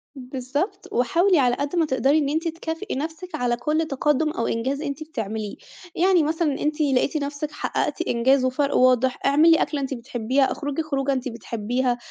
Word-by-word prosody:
بالضبط، 265 - -4
وحاولي 335 +9 +3
على 245 -2 +3
قد 285 +5 -3
ما 330 -2 +3
تقدري 275 +1 +2
إن 290 -3 +1
أنتِ 320 +3 -1
تكافئي 330 +4 -4
نفسِك 320 +4 -5
على 245 -4 0
كُلّ 305 +6 0
تَقدُّم 295 +2 +1
أو 230 - -2
إنجاز 265 +5 -1
أنتِ 285 0 -4
بتعمليه، 220 -8 -5 0.4
يعني 360 -2 +4
مثلًا 310 -2 0
أنتِ 300 +1 -1
لقيتِ 280 +1 +2
نفسِك 290 +1 -4
حقّقتِ 300 - -2
إنجاز 255 +3 +3
وفرق 280 +2 0
واضح، 255 0 +3
اعمِلي 310 +4 +6
أكلة 290 -2 -1
أنتِ 270 0 -3
بتحبيها، 250 +2 0
اخرُجي 290 +1 -3
خروجة 275 -2 -1
أنتِ 260 -1 -2
بتحبيها، 240 +2 -2
280 Hz, 170 wpm, -23 LUFS, 255-310 Hz, 0.4 s, اعمِلي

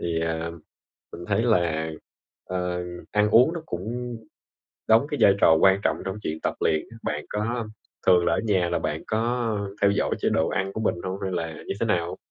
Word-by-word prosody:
thì, 85 -1 -1
à, 80 0 -2 0.6
mình 85 - -8
thấy 110 - +1
là, 85 -8 +1 0.5
ờ, 90 -1 -2 0.3
ăn 105 0 +3
uống 125 +9 +6
nó 170 - -4
cũng 120 - -4 0.7
đóng 115 +5 +5
cái 145 - -2
vai 100 - +7
trò 80 - +7
quan 95 0 +5
trọng - - +1
trong 95 0 -3
chuyện 80 0 -3
tập - - -1
luyện 80 - +1
á. 115 - -12
Bạn 75 0 -3
có 110 +2 -2 0.4
thường 90 -1 +5
là - - +2
ở - - +2
nhà 95 -5 +2
là 85 - +1
bạn 80 -1 -3
có, 110 - 0 0.5
ờ, - - -13
theo 100 - +6
dõi 100 - 0
chế - - +2
độ 80 - +1
ăn 95 0 -1
của 110 - -4
mình 110 - +1
hông 95 +1 -4
hay 95 -1 -2
là 80 -2 -2
như - - -2
thế 115 - +1
nào? 85 -5 0
95 Hz, 215 wpm, -25 LUFS, 85-110 Hz, 0.7 s, vai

